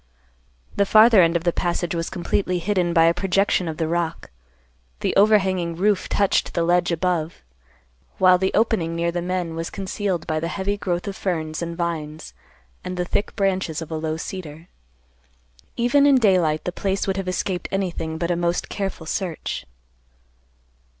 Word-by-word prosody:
The 200 - +3
farther 215 -1 +7
end 165 0 +3
of 170 - 0
the 175 -1 +1
passage 175 -1 -1
was 165 -1 -2
completely 180 +1 -1
hidden 180 -1 0
by 165 -1 +4
a 165 - +4
projection 190 0 +1
of 160 -1 -4
the 160 - -1
rock; 165 - -2 0.7
the - - -1
overhanging 190 -5 +3
roof 200 +2 +1
touched 200 -1 +1
the 170 - +1
ledge 175 +1 +2
above; 170 - -1 0.7
while 185 -1 +5
the 190 0 +1
opening 205 -7 +1
near 170 0 0
the 175 0 -2
men 180 -1 -2
was 165 +1 -4
concealed 195 -2 -3
by 155 -1 -1
the 165 - -2
heavy 195 +3 -2
growth 180 -2 -3
of 200 - -4
ferns 160 -5 -3
and 170 0 -4
vines 160 -3 -4 0.5
and 180 0 -5
the 180 - -1
thick 200 - -2
branches 190 -5 0
of 165 -1 -8
a - - -2
low 155 0 -2
cedar. 165 -2 -7 1.1
Even 280 +4 +4
in 280 - +6
daylight 185 -10 +3
the 180 - -2
place 195 +2 -1
would 195 -1 -1
have 195 -1 -3
escaped 185 0 -2
anything 170 -4 -2
but 170 +1 -1
a - - +1
most 175 0 -1
careful 195 -5 -4
search. 170 - -4
175 Hz, 170 wpm, -22 LUFS, 165-195 Hz, 1.1 s, farther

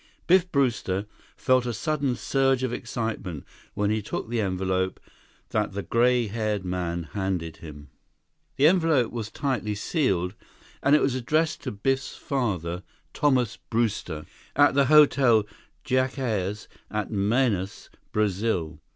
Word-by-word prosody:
Biff 180 0 +4
Brewster 115 -8 0 0.3
felt 130 -2 +2
a 120 - -1
sudden 145 0 0
surge 135 -1 +1
of 125 -2 -1
excitement 110 - -4 0.3
when 105 0 +1
he 110 0 0
took 105 - -5
the 120 -1 0
envelope 95 -1 -1 0.5
that 105 -2 -1
the 100 0 -3
gray 120 0 +3
haired 105 -2 -2
man 90 -2 -2
handed 90 -5 -2
him. 75 -2 -11 0.6
The 145 0 +3
envelope 160 -7 +4
was 115 -3 -4
tightly 120 -7 -2
sealed, 100 - 0 0.5
and 140 +2 +5
it - - +3
was 135 - +2
addressed 155 +6 0
to - - -2
Biff's 135 +6 -1
father, 90 - -2 0.3
Thomas 125 -6 +2
Brewster, 105 -9 -2 0.3
at 145 +1 +5
the 140 0 +4
Hotel 135 -6 +5 0.4
Jacares 125 -6 -1 0.2
in 105 -2 -3
Manaus, 105 -1 0 0.2
Brazil. 95 -6 0
115 Hz, 130 wpm, -26 LUFS, 95-135 Hz, 0.6 s, and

